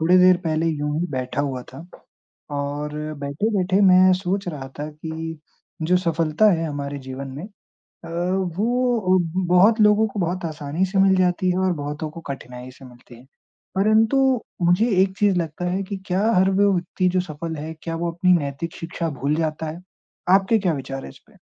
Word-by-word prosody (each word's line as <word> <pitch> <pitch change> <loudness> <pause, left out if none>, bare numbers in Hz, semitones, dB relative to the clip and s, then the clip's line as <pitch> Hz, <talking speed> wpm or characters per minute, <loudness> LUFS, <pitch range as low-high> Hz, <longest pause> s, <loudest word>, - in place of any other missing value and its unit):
थोड़ी 175 +3 +4
देर 185 0 +6
पहले 160 +1 0
यूँ 150 -1 -1
ही 175 - -1
बैठा 130 +1 -2
हुआ 135 -3 -3
था 135 - -10 0.8
और 145 +1 -3 0.3
बैठे-बैठे 185 +6 0
मैं 185 0 +6
सोच 195 +1 -2
रहा 145 -6 -5
था 150 +1 -4
कि 160 +1 -6 0.4
जो 175 +3 +3
सफलता 165 +2 +2
है 165 -1 0
हमारे 145 -1 -5
जीवन 135 +1 -6
में 155 - -6 0.4
अ, - - -15 0.5
वो 230 -4 +2 0.4
बहुत 210 +5 +5
लोगों 210 +1 +5
को 205 -1 -6
बहुत 175 +1 -2
आसानी 155 +3 -2
से 195 +1 -3
मिल 190 0 +5
जाती 180 0 +2
है 180 - -1
और 180 - +1
बहुतों 150 0 -5
को 165 - -10
कठिनाई 125 -1 -9
से 130 +1 -15
मिलती 120 -1 -15
है। 120 - -16 0.5
परंतु 220 +6 +3 0.4
मुझे 175 +7 +3
एक 190 0 -4
चीज़ 205 -3 +2
लगता 170 +1 -3
है 190 +2 -1
कि 195 +1 -5
क्या 185 +2 0
हर 190 0 +4
वो 200 +1 +3
व्यक्ति 185 +1 -1
जो 185 +1 +1
सफल 160 -1 -6
है, 155 +2 -6
क्या 165 -1 -4
वो 170 +1 -2
अपनी 180 +2 +3
नैतिक 150 0 -2
शिक्षा 165 0 -4
भूल 145 +2 +1
जाता 160 0 -2
है? 160 +3 -7 0.5
आपके 195 +4 +4
क्या 185 -4 +1
विचार 135 -1 -5
हैं - - -8
इस - - -17
पे? - - -23
170 Hz, 185 wpm, -22 LUFS, 150-190 Hz, 0.8 s, देर